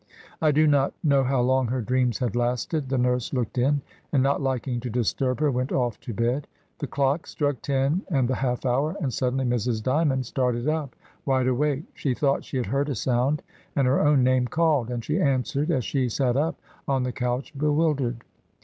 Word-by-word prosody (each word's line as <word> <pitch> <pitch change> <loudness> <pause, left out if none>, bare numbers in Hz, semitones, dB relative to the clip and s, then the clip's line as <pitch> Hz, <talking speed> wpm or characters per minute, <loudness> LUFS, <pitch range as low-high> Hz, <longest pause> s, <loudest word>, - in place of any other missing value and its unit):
I 155 -1 +4
do 155 +2 +4
not 140 -2 +2
know 140 -4 +4
how 130 -1 +1
long 130 0 +2
her 125 +3 -1
dreams 125 0 +1
had 125 -3 -2
lasted; 125 +4 -1
the 135 - 0
nurse 125 0 0
looked 125 -1 -1
in, 140 +2 +2 0.3
and 135 -4 +3
not 140 +1 +1
liking 130 -2 -1
to 125 +1 -5
disturb 125 +3 0
her 150 -2 +3
went 125 +1 -2
off 120 -4 0
to - - -7
bed. 120 +6 -1 0.3
The 145 - -3
clock 140 +4 0
struck 145 -5 -1
ten 140 +5 +1
and 135 -7 +2
the 130 - 0
half 125 -1 -1
hour, 140 +7 +1
and 135 -9 -2
suddenly 130 +2 0
Mrs. 120 -2 0
Dymond 135 -1 +1
started 125 0 -1
up, 155 -4 -1 0.3
wide 130 -2 +1
awake; 140 +3 +1
she 130 -4 -1
thought 140 0 +1
she 135 - -4
had 125 - 0
heard 140 +2 0
a 140 - -1
sound 130 +6 0 0.3
and 140 - +2
her 130 +2 +3
own 145 -3 +4
name 130 0 +3
called, 150 -3 +1
and 120 -2 -4
she 155 +6 0
answered 140 +2 0
as 130 -8 +1
she 130 -3 0
sat 125 +1 0
up 155 +4 0 0.3
on 135 -2 +1
the 125 - -1
couch, 125 +4 -3
bewildered. 145 -5 0
130 Hz, 205 wpm, -25 LUFS, 125-145 Hz, 0.3 s, I